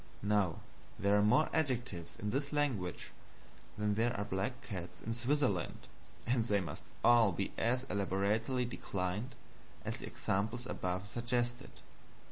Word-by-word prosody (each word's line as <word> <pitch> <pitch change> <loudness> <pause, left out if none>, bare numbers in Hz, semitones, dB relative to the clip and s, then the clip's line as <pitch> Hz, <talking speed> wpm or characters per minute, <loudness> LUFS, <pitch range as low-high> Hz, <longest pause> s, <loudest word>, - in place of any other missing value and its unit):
Now 100 -5 +2 0.4
there 100 +1 +3
are 105 - +5
more 105 +9 +5
adjectives 125 - -1
in 105 0 -2
this 140 +4 -1
language 130 - -1 0.7
than 105 0 +1
there 115 +2 +1
are 100 - -1
black 100 +7 -2
cats 95 -5 -5
in 115 - -3
Switzerland, 120 -5 0 0.4
and 120 -1 +2
they 105 -3 +2
must 95 - -5 0.2
all 120 -4 +7
be 95 +3 -2
as 125 +2 +1
elaborately 105 +3 +1
declined 105 +1 -3 0.5
as - - -2
the - - -7
examples 110 +5 -1
above 90 -3 -2
suggested. 120 +2 -2
110 Hz, 135 wpm, -35 LUFS, 100-120 Hz, 0.7 s, all